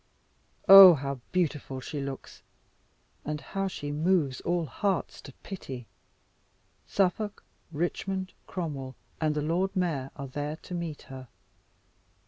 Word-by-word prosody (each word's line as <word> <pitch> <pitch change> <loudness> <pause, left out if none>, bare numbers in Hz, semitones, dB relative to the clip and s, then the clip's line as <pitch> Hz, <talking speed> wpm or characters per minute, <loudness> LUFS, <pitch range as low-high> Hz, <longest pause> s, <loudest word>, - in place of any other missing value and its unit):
Ah, 195 -3 +12
how 140 -1 -4
beautiful 150 -7 -1
she 145 +3 -5
looks! 135 -1 -7 0.8
and 150 0 -3
how 195 +7 -3
she 145 -6 -5
moves 150 -3 +1
all 175 -1 0
hearts 190 - -2
to 140 - -11
pity! 135 - -7 1.0
Suffolk, 200 +2 0 0.3
Richmond, 185 +4 -3
Cromwell, 140 -7 -5 0.2
and 155 -1 +1
the 150 - -1
Lord 180 +6 0
Mayor 160 -8 -1
are 140 -1 -6
there 145 +3 -4
to 180 - -11
meet 170 -4 -4
her. 130 -1 -10
155 Hz, 120 wpm, -28 LUFS, 140-185 Hz, 1.0 s, Ah